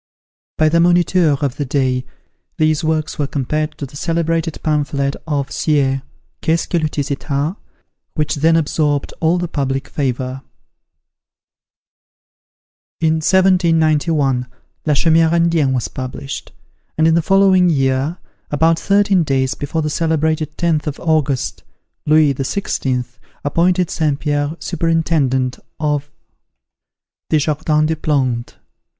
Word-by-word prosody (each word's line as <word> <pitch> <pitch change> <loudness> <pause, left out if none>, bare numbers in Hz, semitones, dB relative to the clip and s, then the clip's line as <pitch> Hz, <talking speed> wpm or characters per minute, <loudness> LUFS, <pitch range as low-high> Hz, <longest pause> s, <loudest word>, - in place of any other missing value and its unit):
By 155 - +4
the 165 +2 +3
Moniteur 175 -3 +3
of 135 -3 -1
the 145 - -1
day, 130 -2 0 0.5
these 155 0 +2
works 155 -1 -1
were 145 - 0
compared 155 +3 -2
to 145 - -4
the 140 +2 -13
celebrated 165 0 -1
pamphlet 140 -2 0
of 140 -3 -2
Sieyes, 135 -3 +1 0.4
"Qu'est 165 +1 +1
ce - - -4
que 175 - 0
le 155 -1 0
tiers 145 -1 -3
etat?" 140 +4 -2 0.6
which 150 -2 0
then 165 +3 +3
absorbed 150 -2 0
all 165 +2 +2
the 175 0 -2
public 135 -3 -2
favour. 130 -2 -3 2.6
In 160 0 +2
1791, 160 -7 +2 0.4
"La 150 - +3
Chaumiere 165 +2 +3
Indienne" 165 -5 +2
was 125 -3 -1
published: 130 - -6 0.5
and 160 0 +4
in 165 - +4
the 170 - +3
following 190 0 +4
year, 135 +2 0 0.3
about 160 +3 +2
thirteen 200 -2 +3
days 135 -4 0
before 155 +3 -3
the 150 - -1
celebrated 155 -1 0
10th 160 -3 0
of 150 - -4
August, 150 -5 0 0.5
Louis 155 -2 +5
XVI. 130 -3 -2 0.4
appointed 175 +4 +1
St. 150 -3 0
Pierre 145 0 -1
superintendant 150 -6 0 0.2
of 145 -2 -1 1.2
the 155 - +3
"Jardin 150 0 +1
des 160 +1 0
Plantes." 130 -6 -1
155 Hz, 125 wpm, -18 LUFS, 140-165 Hz, 2.6 s, Louis